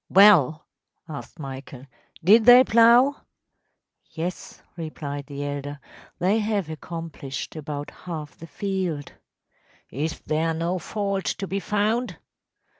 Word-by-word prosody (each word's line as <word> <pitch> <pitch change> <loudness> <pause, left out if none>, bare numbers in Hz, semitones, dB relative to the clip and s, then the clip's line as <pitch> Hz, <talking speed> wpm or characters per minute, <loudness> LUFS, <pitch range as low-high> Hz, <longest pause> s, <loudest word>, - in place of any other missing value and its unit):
‚ÄúWell,‚ÄĚ 180 -7 +7 0.5
asked 150 +1 -8
Michael, 135 -2 -8 0.4
“did 215 +6 +6
they 245 +1 +9
plough?‚ÄĚ 240 +4 +5 1.0
‚ÄúYes,‚ÄĚ 180 +1 -6 0.2
replied 145 -4 -6
the 140 0 -5
elder; 145 0 -5 0.4
“they 195 +5 +2
have 205 -6 -1
accomplished 160 -4 -6
about 145 -2 -5
half 155 -4 -7
the 165 - -11
field.‚ÄĚ 185 -7 -3 0.8
“Is 155 +6 -3
there 160 +1 0
no 170 +3 -1
fault 200 +1 -3
to 195 - -2
be 195 +1 -2
found? 210 -1 -1
165 Hz, 115 wpm, -24 LUFS, 145-205 Hz, 1.0 s, they